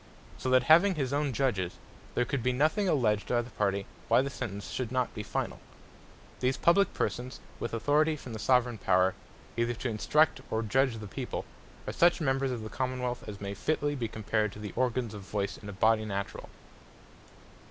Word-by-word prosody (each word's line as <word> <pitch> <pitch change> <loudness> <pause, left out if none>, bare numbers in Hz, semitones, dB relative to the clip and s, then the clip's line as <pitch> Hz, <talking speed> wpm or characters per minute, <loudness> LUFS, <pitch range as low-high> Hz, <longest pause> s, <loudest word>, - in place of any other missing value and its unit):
So 130 - -2
that 130 -1 +5
having 170 +8 +6
his 135 -3 -1
own 145 -1 +1
Judges, 110 -9 0 0.4
there 125 - +2
could 135 +2 -2
be 125 +2 +1
nothing 155 +10 +2
alledged 110 -9 +2
by 120 -1 +1
the 120 - -12
party, 100 -2 0 0.2
why 115 +3 +5
the 140 - -3
sentence 105 -6 -5
should 125 -3 -3
not 130 -2 0
be 105 - -4
finall, - - -3 0.8
These 130 +1 +1
publique 195 +3 +3
persons, 125 +1 -2 0.2
with 115 - -3
Authority 145 +7 +2
from 130 -5 -9
the 110 - -5
Soveraign 125 -3 +2
Power, 95 0 +3 0.4
either 120 +1 0
to 120 - -3
Instruct, 150 +8 +2
or 110 +1 0
Judge 130 +2 +2
the 110 - -7
people, - - -4 0.4
are - - -4
such 175 +1 +4
members 135 -3 +1
of 120 -3 -3
the - - -5
Common 130 +1 -2
wealth, 125 -1 -2
as 100 -1 -7
may 100 0 -4
fitly 145 +6 0
be 125 -5 -2
compared 110 -1 -1
to - - -10
the 105 -3 -6
organs 125 -3 0
of 105 - -7
Voice 100 0 -3
in 105 - -9
a - - -4
Body 110 +3 +3
naturall. 100 -2 -4
120 Hz, 195 wpm, -30 LUFS, 105-135 Hz, 0.8 s, having